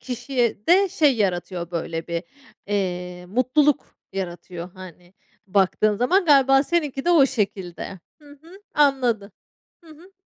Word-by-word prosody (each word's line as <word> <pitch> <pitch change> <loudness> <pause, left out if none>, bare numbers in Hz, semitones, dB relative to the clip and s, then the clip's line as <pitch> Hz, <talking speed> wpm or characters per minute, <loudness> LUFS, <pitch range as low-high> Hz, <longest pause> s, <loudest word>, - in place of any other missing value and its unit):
kişiye 245 -3 -2
de 385 +3 +5
şey 300 -8 +2
yaratıyor, 175 -4 -2
böyle, 165 -1 -4
bir, 170 -1 -3 0.4
eee, 180 -3 -3
mutluluk 255 +8 +1 0.2
yaratıyor, 175 -1 -6
hani, 180 -1 -13 0.3
baktığın 195 +2 +2
zaman. 360 - +2
Galiba 270 -3 +5
seninki 290 -4 -1
de 350 - +2
o 310 -6 +6
şekilde. 195 -6 -4 0.2
Hı 295 - -17
hı, 355 +5 -15
anladım. 250 -8 +2 0.5
Hı 325 - -16
hı. 335 +5 -16
225 Hz, 130 wpm, -23 LUFS, 180-285 Hz, 0.5 s, o